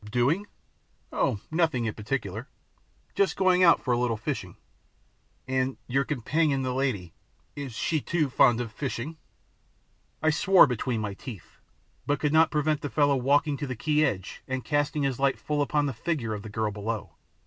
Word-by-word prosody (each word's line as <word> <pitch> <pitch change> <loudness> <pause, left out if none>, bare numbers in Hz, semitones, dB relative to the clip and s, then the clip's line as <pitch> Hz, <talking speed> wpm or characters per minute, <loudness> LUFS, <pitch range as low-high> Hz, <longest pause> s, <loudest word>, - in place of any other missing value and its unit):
"Doing? 140 - +1 0.7
Oh, 100 - 0
nothing 160 -7 +1
in 110 - -1
particular, 110 0 -4 0.6
just 200 - +1
going 185 -1 +4
out 170 -2 +7
for 125 - 0
a 120 - +1
little 120 -2 0
fishing." 110 - -4 0.9
"And 130 0 0
your 135 +2 0
companion 145 +1 0
the 130 -1 -1
lady 125 -11 -1 0.4
is 140 -4 -6
she 155 +6 -1
too 160 -1 0
fond 125 -2 +4
of 115 -3 -5
fishing?" 140 +5 -4 1.1
I 160 - +4
swore 190 +4 +6
between 125 -3 -2
my 105 -2 -3
teeth, 105 - -10 0.5
but 145 0 +1
could 150 -1 0
not 160 +1 +5
prevent 150 -1 0
the 145 - -3
fellow 145 -1 +3
walking 140 +3 +2
to 145 - -4
the 125 - -4
quay 150 +6 +1
edge 95 -9 -2
and 130 -1 -3
casting 145 0 0
his 135 -2 -1
light 135 0 +2
full 150 -1 -2
upon 145 +1 +1
the 140 - -2
figure 120 -3 -2
of 105 - -5
the 110 - -8
girl 110 0 -1
below. 105 -2 -4
135 Hz, 175 wpm, -27 LUFS, 115-150 Hz, 1.1 s, out